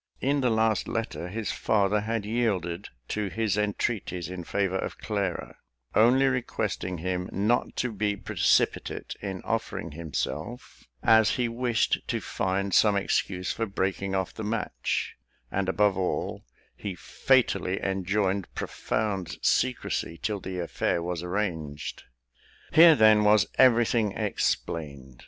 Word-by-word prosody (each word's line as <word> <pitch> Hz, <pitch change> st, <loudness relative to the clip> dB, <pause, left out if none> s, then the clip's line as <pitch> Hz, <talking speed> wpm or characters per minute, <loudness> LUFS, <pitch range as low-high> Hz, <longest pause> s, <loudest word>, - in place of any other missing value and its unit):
In 140 Hz, +1 st, +1 dB
the 125 Hz, -, +2 dB
last 110 Hz, -2 st, +1 dB
letter, 110 Hz, -6 st, -3 dB
the 110 Hz, +4 st, -4 dB
father 105 Hz, +1 st, +1 dB
had 110 Hz, 0 st, -2 dB
yielded 100 Hz, -6 st, -1 dB, 0.2 s
to 105 Hz, -1 st, -1 dB
his 110 Hz, 0 st, 0 dB
entreaties 105 Hz, -4 st, -2 dB
in 90 Hz, -1 st, -6 dB
favour 95 Hz, +1 st, -1 dB
of -, -, -4 dB
Clara; 100 Hz, -5 st, -3 dB, 0.4 s
only 125 Hz, +5 st, +5 dB
requesting 125 Hz, -8 st, -1 dB
him 90 Hz, +2 st, -3 dB
not 105 Hz, +6 st, +1 dB
to 125 Hz, -, -1 dB
be 105 Hz, -1 st, -1 dB
precipitate -, -, 0 dB
in 95 Hz, -2 st, -5 dB
offering 110 Hz, -7 st, -3 dB
himself, 80 Hz, -, -5 dB, 0.2 s
as 110 Hz, -1 st, +5 dB
he 125 Hz, -1 st, +1 dB
wished 120 Hz, -1 st, +1 dB
to -, -, -1 dB
find 95 Hz, +1 st, -2 dB
some 105 Hz, -2 st, +5 dB
excuse 95 Hz, -1 st, 0 dB
for 115 Hz, -, -2 dB
breaking 95 Hz, 0 st, -2 dB
off 95 Hz, -1 st, -1 dB
the 110 Hz, -, -6 dB
match; 110 Hz, +1 st, -2 dB, 0.3 s
and, 95 Hz, -1 st, -1 dB
above 105 Hz, 0 st, +3 dB
all, 95 Hz, -1 st, -2 dB, 0.3 s
he 100 Hz, -3 st, -5 dB
fatally 100 Hz, -6 st, +1 dB
enjoined 95 Hz, 0 st, -1 dB
profound 100 Hz, -6 st, -2 dB
secrecy 125 Hz, -9 st, 0 dB
till 105 Hz, -2 st, -2 dB
the 95 Hz, 0 st, -6 dB
affair 85 Hz, -1 st, -1 dB
was 85 Hz, -1 st, -3 dB
arranged. 85 Hz, -6 st, -3 dB, 0.7 s
Here, 165 Hz, 0 st, +9 dB
then, 110 Hz, -3 st, +6 dB
was 105 Hz, -2 st, +5 dB
everything 115 Hz, -4 st, +4 dB
explained. 70 Hz, -, -2 dB
100 Hz, 130 wpm, -27 LUFS, 90-110 Hz, 0.7 s, Here